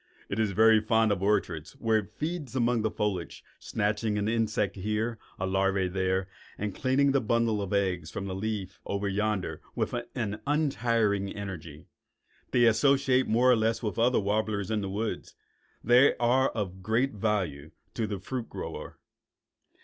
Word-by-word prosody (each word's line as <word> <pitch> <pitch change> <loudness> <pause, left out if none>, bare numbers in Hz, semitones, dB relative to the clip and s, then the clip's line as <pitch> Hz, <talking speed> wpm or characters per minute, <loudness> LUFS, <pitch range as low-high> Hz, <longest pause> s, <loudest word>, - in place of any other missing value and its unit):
It 100 - -2
is 110 -2 +2
very 110 +1 +6
fond 110 0 +2
of 95 -3 0
orchards 85 -6 0
where 110 -1 +1
it 105 0 -8
feeds 155 -5 -4
among 120 -2 +2
the 110 - +1
foliage, 100 -5 -3 0.2
snatching 105 0 -1
an 105 0 0
insect 110 -3 0
here, 110 +3 -2 0.2
a 95 - -2
larva 95 0 +1
there, 95 0 0 0.3
and 105 -1 -3
cleaning 135 +4 +2
the 135 -1 +2
bundle 115 -1 +1
of 100 - -4
eggs 95 -5 0
from 100 - -5
the 95 - -4
leaf 100 -1 -4
over 100 0 -2
yonder 100 -5 -1
with - - -1 0.2
an 105 -5 -3
untiring 115 -9 +1
energy. 85 -7 -7 0.6
They 120 -2 +4
also 115 - +7 0.2
associate 130 -1 +2
more 125 +3 +4
or - - +6
less 115 +1 0
with 105 - -1
the - - -2
other 125 +2 +4
warblers 105 0 -1
in 110 -1 0
the 100 - -3
woods. 105 +3 -4 0.5
They 125 +4 +5
are 125 +2 +3
of 95 -4 -4
great 115 +7 +1
value 95 -9 -2 0.2
to 110 - -1
the 105 -1 -3
fruit 120 +5 -5
grower. - - -7
105 Hz, 170 wpm, -28 LUFS, 95-115 Hz, 0.6 s, also